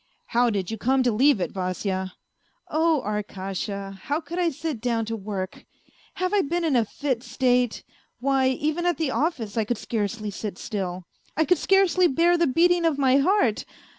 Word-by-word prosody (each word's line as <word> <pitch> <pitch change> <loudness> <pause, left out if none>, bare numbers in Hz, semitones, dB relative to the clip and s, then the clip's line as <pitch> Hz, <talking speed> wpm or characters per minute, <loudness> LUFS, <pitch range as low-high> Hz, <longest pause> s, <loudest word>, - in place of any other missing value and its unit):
" - - -46
How 240 +1 +4
did 195 -4 -2
you 225 - -5
come 260 +3 +2
to 245 - +2
leave 260 +2 +4
it, 180 - -2
Vasya? 185 0 -3 0.3
" - - -45 0.3
"Oh, 315 -2 +2
Arkasha 200 -1 -4
1 - - -9
How 290 +2 0
could 335 +3 -6
I 350 -2 +2
sit 300 -5 -4
down 230 -2 0
to 225 +1 -3
work! 195 -3 -5 0.5
Have 370 +2 -1
I 410 - +4
been 345 +3 -1
in 300 -5 +2
a 235 - +4
fit 260 +1 -2
state? 250 -1 +1 0.4
Why, 265 +1 +2
even 310 +6 0
at 350 - +1
the 315 -5 -1
office 250 - -1
I 220 - +3
could 230 +2 -2
scarcely 215 -1 -3
sit 200 -1 -5
still, 185 -3 -4 0.3
I 315 - +3
could 360 -1 +3
scarcely 380 -2 +4
bear 340 +4 +3
the 340 -1 +2
beating 345 +5 +3
of 325 -4 +2
my 265 -1 +4
heart. 280 - +2
255 Hz, 195 wpm, -25 LUFS, 210-320 Hz, 0.5 s, How